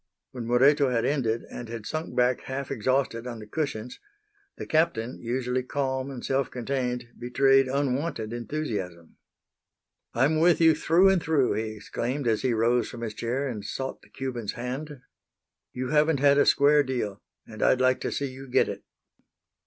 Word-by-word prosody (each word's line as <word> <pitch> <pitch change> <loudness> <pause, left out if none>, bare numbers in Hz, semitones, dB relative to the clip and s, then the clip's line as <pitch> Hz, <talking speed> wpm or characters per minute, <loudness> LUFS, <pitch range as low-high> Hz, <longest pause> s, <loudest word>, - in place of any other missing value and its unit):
When 120 -3 -6
Moreto 135 +3 +4
had 115 -2 0
ended 120 -6 0
and 120 -2 -7
had 115 -2 -6
sunk 155 -2 -4
back 125 0 +2
half 135 +1 -4
exhausted 125 -1 0
on 120 -2 -5
the 110 - -9
cushions 125 -2 -4 0.6
the - - -6
Captain, 155 -7 0
usually 125 +1 -1
calm 130 0 -2
and 130 -3 -7
self 135 -1 0
contained, 125 -1 -3
betrayed 135 +2 +3
unwonted 135 -3 -1
enthusiasm. 110 - -5 1.0
"I'm 140 +6 +3
with 170 +1 +4
you 165 -1 +6
through 170 +5 +4
and 190 -3 +3
through," 150 -5 +2
he 110 0 -3
exclaimed 125 +5 -3
as 110 -2 +2
he 130 - +1
rose 120 +2 +2
from 120 - -9
his 110 -2 -4
chair 125 +6 -2
and 110 -6 -5
sought 135 +5 -5
the - - -21
Cuban's 125 -5 -4
hand. 130 +3 -6 0.7
"You 125 0 -4
haven't 155 -1 +3
had 140 0 +5
a - - +4
square 145 +1 +5
deal, 120 -7 -3 0.2
and 110 - -10
I'd 130 - +4
like 130 0 +3
to - - -2
see 140 - -2
you 135 +1 -10
get - - +3
it." - - -6
130 Hz, 170 wpm, -26 LUFS, 120-140 Hz, 1.0 s, you